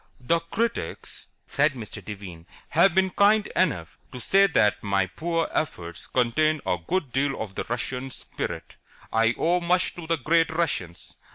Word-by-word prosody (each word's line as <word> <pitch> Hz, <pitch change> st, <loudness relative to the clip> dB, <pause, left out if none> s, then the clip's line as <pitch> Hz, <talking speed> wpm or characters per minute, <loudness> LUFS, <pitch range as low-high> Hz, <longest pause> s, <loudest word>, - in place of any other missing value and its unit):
"The 165 Hz, +7 st, +1 dB
critics," 225 Hz, +8 st, -3 dB, 0.2 s
said 145 Hz, 0 st, +2 dB
Mr. 115 Hz, -5 st, -8 dB
Devine, 95 Hz, -5 st, -9 dB, 0.2 s
"have 170 Hz, +3 st, +4 dB
been 190 Hz, 0 st, +3 dB
kind 210 Hz, +2 st, +4 dB
enough 90 Hz, -, 0 dB
to 125 Hz, -, -7 dB
say 195 Hz, +10 st, +4 dB
that 105 Hz, -, +2 dB
my 100 Hz, -1 st, +1 dB
poor 165 Hz, -, -2 dB
efforts 85 Hz, -, -3 dB
contain 155 Hz, +6 st, +2 dB
a 90 Hz, -, 0 dB
good 165 Hz, -9 st, -1 dB
deal 135 Hz, +1 st, 0 dB
of 105 Hz, -3 st, -5 dB
the -, -, -4 dB
Russian 125 Hz, +2 st, -2 dB
spirit. -, -, -6 dB, 0.4 s
I 115 Hz, +1 st, +3 dB
owe 175 Hz, +2 st, +2 dB
much 180 Hz, +1 st, +1 dB
to 170 Hz, -2 st, -9 dB
the 165 Hz, 0 st, +1 dB
great 165 Hz, +5 st, +2 dB
Russians. 135 Hz, -, -3 dB
145 Hz, 160 wpm, -25 LUFS, 110-170 Hz, 0.4 s, have